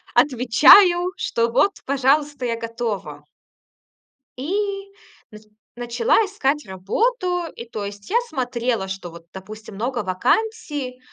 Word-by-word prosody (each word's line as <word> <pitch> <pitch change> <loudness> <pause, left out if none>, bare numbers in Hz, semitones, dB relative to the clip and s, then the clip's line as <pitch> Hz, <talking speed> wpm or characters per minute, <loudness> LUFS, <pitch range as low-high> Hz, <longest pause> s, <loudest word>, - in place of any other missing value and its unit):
отвечаю, 345 - +6
что 230 0 -1
вот, 385 +11 +3
пожалуйста, 280 0 +1
я 230 - -1
готова. 220 -10 -5 1.1
И 395 +6 -3 0.4
нач 215 0 -13 0.3
начала 245 - 0
искать 300 - -1
работу. 355 - -1
И, 235 - -8
то 215 -2 -5
есть, 200 0 -9
я 460 - +2
смотрела, 245 -6 -2
что 190 -2 -6
вот, 170 0 -13
допустим, 215 +2 -10
много 240 +2 -2
вакансий, 280 - -1
250 Hz, 115 wpm, -21 LUFS, 215-350 Hz, 1.1 s, отвечаю